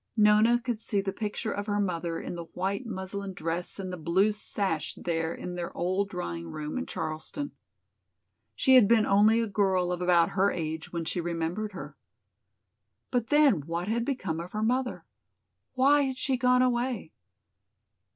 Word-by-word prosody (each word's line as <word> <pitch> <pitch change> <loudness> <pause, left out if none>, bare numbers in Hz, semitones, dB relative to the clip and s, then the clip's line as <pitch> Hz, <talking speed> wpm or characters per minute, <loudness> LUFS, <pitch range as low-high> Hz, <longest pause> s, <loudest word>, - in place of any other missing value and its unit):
Nona 215 +3 +5
could 240 -3 -3
see 205 -2 0
the 195 -1 -2
picture 215 +1 -3
of 205 +1 -4
her 205 0 0
mother 170 -4 -1
in - - -5
the 170 -1 -6
white 195 +6 -2
muslin 195 -1 -5
dress 165 +2 -3
and 185 -2 -5
the - - -4
blue 180 +6 +2
sash 195 -6 -2
there 165 -1 -2
in 180 - -6
their 175 -1 -4
old 185 +3 0
drawing 85 - -5
room 150 - -5
in - - -5
Charleston. 160 - -4 1.0
She 265 - +4
had 250 -6 +8
been 225 -1 +4
only 215 +3 +5
a - - +1
girl 190 -3 +1
of 180 0 -3
about 175 -2 +4
her 195 +1 +2
age 160 -1 -4
when 170 -1 -3
she 175 - -2
remembered 170 +5 -3
her. - - -8 1.2
But 245 -3 0
then 290 - +4
what 170 +2 -3
had 230 +2 0
become 240 - -2
of 170 +2 -7
her 215 +1 -1
mother? 250 +2 0 0.7
Why 275 +3 +4
had 265 -2 -1
she 265 +1 0
gone 250 0 +4
away? 245 -6 -1
200 Hz, 170 wpm, -28 LUFS, 170-230 Hz, 1.2 s, had